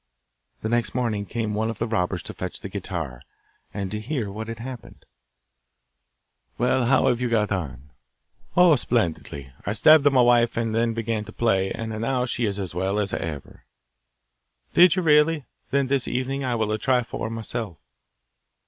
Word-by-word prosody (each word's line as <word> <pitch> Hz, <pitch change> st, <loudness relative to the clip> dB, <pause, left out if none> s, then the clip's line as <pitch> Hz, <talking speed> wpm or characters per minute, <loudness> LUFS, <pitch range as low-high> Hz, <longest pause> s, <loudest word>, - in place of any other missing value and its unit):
The 110 Hz, -, -1 dB
next 120 Hz, 0 st, 0 dB
morning 110 Hz, -5 st, -1 dB
came 110 Hz, -1 st, -2 dB
one 110 Hz, +2 st, 0 dB
of 115 Hz, -, -5 dB
the 115 Hz, -, -1 dB
robbers 95 Hz, -5 st, -1 dB
to -, -, -6 dB
fetch 90 Hz, -1 st, -6 dB
the 100 Hz, -, -6 dB
guitar, 85 Hz, -10 st, -5 dB, 0.5 s
and 100 Hz, -2 st, -4 dB
to 105 Hz, -, -3 dB
hear 115 Hz, -3 st, -3 dB
what 110 Hz, +2 st, -6 dB
had 115 Hz, 0 st, -5 dB
happened. 125 Hz, +1 st, -9 dB, 1.5 s
'Well, 125 Hz, +1 st, +2 dB
how 135 Hz, -, +4 dB
have 125 Hz, -2 st, +2 dB
you 125 Hz, -, 0 dB
got 105 Hz, -3 st, +1 dB
on?' 70 Hz, -8 st, -4 dB, 0.7 s
'Oh, 180 Hz, -3 st, +7 dB
splendidly! 80 Hz, -, -2 dB
I 105 Hz, -, -2 dB
stabbed 145 Hz, +4 st, +6 dB
my 135 Hz, -, +3 dB
wife, 120 Hz, -1 st, +4 dB
and 115 Hz, -1 st, -1 dB
then 115 Hz, 0 st, +1 dB
began 115 Hz, -1 st, -2 dB
to -, -, -10 dB
play, 95 Hz, -5 st, +1 dB
and 115 Hz, -1 st, -4 dB
now 125 Hz, +1 st, 0 dB
she 120 Hz, -1 st, -1 dB
is 100 Hz, -2 st, -2 dB
as 95 Hz, -4 st, -5 dB
well 95 Hz, +3 st, -1 dB
as 105 Hz, -2 st, -1 dB
ever.' 75 Hz, -4 st, -6 dB, 1.1 s
'Did 180 Hz, 0 st, +7 dB
you 185 Hz, -, 0 dB
really? 150 Hz, -1 st, +4 dB, 0.2 s
Then 140 Hz, 0 st, +2 dB
this 135 Hz, -1 st, 0 dB
evening 135 Hz, +2 st, -2 dB
I 125 Hz, -2 st, 0 dB
will 110 Hz, -2 st, 0 dB
try 125 Hz, +2 st, +2 dB
for 110 Hz, -1 st, -5 dB
myself. 115 Hz, -5 st, -5 dB
115 Hz, 175 wpm, -24 LUFS, 100-125 Hz, 1.5 s, Oh